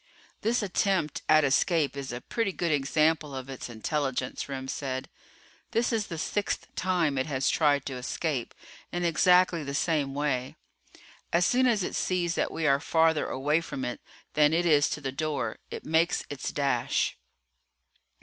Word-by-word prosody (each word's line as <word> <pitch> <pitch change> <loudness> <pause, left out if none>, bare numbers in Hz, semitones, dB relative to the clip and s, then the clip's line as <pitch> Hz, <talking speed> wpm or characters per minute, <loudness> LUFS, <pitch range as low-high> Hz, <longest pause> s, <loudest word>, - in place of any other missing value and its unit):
"This 225 +1 +1
attempt 190 -4 0
at 155 0 +6
escape 145 +2 +2
is 140 -2 -5
a 120 +1 -5
pretty 225 -4 -1
good 170 -3 -1
example 150 +1 +1
of 130 0 -6
its 130 - -7
intelligence," 130 +2 -2
Remm 130 -1 -5
said. 130 -1 -4 0.6
"This 235 +1 +1
is 220 -2 0
the 165 - -5
sixth 205 +5 -2
time 170 -7 +1
it 130 - -1
has 135 -3 +1
tried 145 -3 +2
to 135 - -4
escape 125 0 -3 0.4
in 175 0 -1
exactly 180 0 +4
the 140 0 -4
same 145 -3 0
way. 135 -3 -1 0.8
As 175 +1 +3
soon 255 +4 +3
as 220 -6 +2
it - - -3
sees 175 -2 0
that - - 0
we 160 - -2
are 140 -2 +4
farther 160 0 +2
away 150 +5 +1
from 130 -5 -5
it 125 - -5 0.3
than 150 0 +4
it 175 +2 +2
is 150 -3 +4
from 150 - -4
the 135 - -2
door, 155 +2 -2
it - - -7
makes 160 +2 +2
its 145 - -4
dash." 135 -4 0
150 Hz, 170 wpm, -28 LUFS, 135-175 Hz, 0.8 s, at